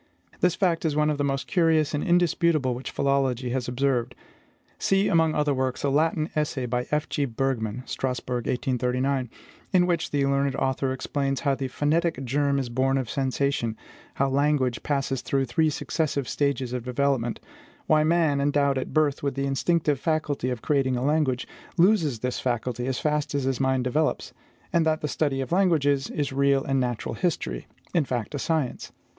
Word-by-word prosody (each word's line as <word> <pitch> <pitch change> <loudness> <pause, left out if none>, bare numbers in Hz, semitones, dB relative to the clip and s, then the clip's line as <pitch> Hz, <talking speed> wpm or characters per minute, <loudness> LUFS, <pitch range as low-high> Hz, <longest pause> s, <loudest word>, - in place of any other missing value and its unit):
This 180 -1 +2
fact 175 -5 +1
is 155 -3 0
one 150 0 +2
of 145 - -3
the - - +1
most 135 -1 -1
curious 160 -4 +2
and 145 - -1
indisputable 170 -6 +2
which 125 +2 -6
philology 135 -3 0
has 130 -1 -2
observed. 125 -1 0 0.6
See, 195 +1 +2
among 160 -2 +3
other 150 -1 +2
works, 130 -1 -2
a 140 - +1
Latin 155 +1 +1
essay 145 -4 -1
by 125 0 -2
F. 150 +1 0
G. 145 - -1
Bergmann 125 -2 -2
(Strasbourg, 125 -2 -3
1839), 125 0 0 0.4
in 180 -2 +4
which 170 -2 0
the 140 -1 +1
learned 140 0 +1
author 130 0 0
explains 135 +1 -2
how 140 -3 +2
the 135 0 -2
phonetic 150 +1 0
germ 140 +2 +1
is 135 -2 -1
born 130 +3 +1
of 130 -4 -2
sensation; 135 -4 -1 0.4
how 140 - +1
language 135 -3 +1
passes 135 -3 -1
through 135 -1 0
three 155 +6 +2
successive 145 -3 -2
stages 135 -3 -1
of 125 -2 -3
development; 125 -1 0 0.5
why 155 -1 +4
man, 155 -3 +2
endowed 140 -1 +2
at 130 - -6
birth 150 -2 +2
with 140 -1 -2
the 140 0 -1
instinctive 145 +1 +1
faculty 155 -5 -1
of 125 -3 -4
creating 135 -3 +1
a 125 - -1
language, 145 -4 +1 0.3
loses 170 - +3
this 125 0 -2
faculty 125 0 -2
as 130 -2 -1
fast 150 -1 -1
as 140 - 0
his 135 -1 -1
mind 130 -1 +1
develops; 150 +5 -1 0.4
and 170 - +4
that 155 -1 +1
the 150 - -1
study 140 -2 0
of 135 - -5
languages 155 -7 +2
is 145 -3 -2
real 140 0 +3
natural 125 -4 -1
history, 150 - -2 0.3
in 170 - +3
fact, 120 -4 -3
a 145 - -3
science. 155 -6 -2
140 Hz, 175 wpm, -25 LUFS, 130-150 Hz, 0.6 s, in